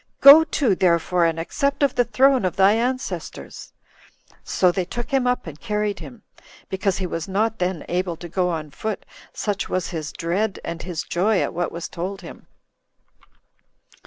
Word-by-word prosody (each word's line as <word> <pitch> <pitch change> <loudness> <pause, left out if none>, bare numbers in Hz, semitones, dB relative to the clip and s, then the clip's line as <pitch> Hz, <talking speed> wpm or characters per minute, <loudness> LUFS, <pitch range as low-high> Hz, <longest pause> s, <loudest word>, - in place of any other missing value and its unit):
Go 285 +3 +10
to, 285 -8 +1
therefore, 175 -1 +2
and 165 0 0
accept 280 - -1
of 280 - +3
the 245 - +3
throne 255 +1 +3
of 185 - -1
thy 195 +1 +5
ancestors." 250 +3 -4 0.7
So 180 -2 +2
they 185 +1 -1
took 240 +6 -6
him 265 -2 +2
up 250 0 0
and 155 -2 -9
carried 210 -2 -2
him, 240 -3 -11 0.5
because 190 0 -1
he 190 - -2
was 165 -2 -4
not 220 +3 0
then 180 -3 -2
able 180 0 -1
to 175 - -8
go 180 +1 0
on 155 -3 -4
foot, 215 +7 -4 0.3
such 205 -2 -3
was 185 -2 -1
his 155 -5 -5
dread 185 +5 -2
and 170 0 -5
his 175 -3 -4
joy 195 +3 +1
at - - -3
what 175 +1 -2
was 170 0 -5
told 190 +3 -5
him. - - -12
190 Hz, 175 wpm, -22 LUFS, 175-225 Hz, 0.7 s, Go